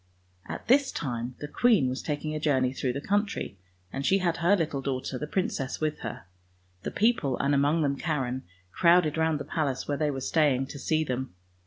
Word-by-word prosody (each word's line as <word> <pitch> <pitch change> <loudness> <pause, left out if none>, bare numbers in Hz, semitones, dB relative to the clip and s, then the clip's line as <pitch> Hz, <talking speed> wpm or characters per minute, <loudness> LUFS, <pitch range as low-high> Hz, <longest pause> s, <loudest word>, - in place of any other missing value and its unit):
At - - -6
this 275 +3 +4
time 120 -1 -3
the 145 - -4
queen 210 - +3
was 130 +1 -2
taking 155 0 -3
a 155 - -2
journey 130 -4 +2
through 130 -2 -1
the 140 - -4
country, 205 - -1 0.3
and 135 - -3
she 190 +7 +4
had 175 -3 0
her 175 +4 +4
little 155 -6 -1
daughter 130 -1 -3
the 150 - -4
princess 150 -6 -2
with 155 -1 -1
her. 115 - -6 0.6
The - - -3
people, 210 - +1
and 140 +1 +1
among 145 +3 +3
them 140 -1 +1
Karen, 130 -6 -1 0.3
crowded 170 - +4
round 160 -1 +1
the - - -5
palace 140 -5 -2
where 145 - 0
they 150 -1 +2
were 135 -2 -3
staying, 135 -3 +2
to 140 - -7
see 155 +3 +1
them. 130 -7 -4
145 Hz, 200 wpm, -28 LUFS, 135-165 Hz, 0.6 s, this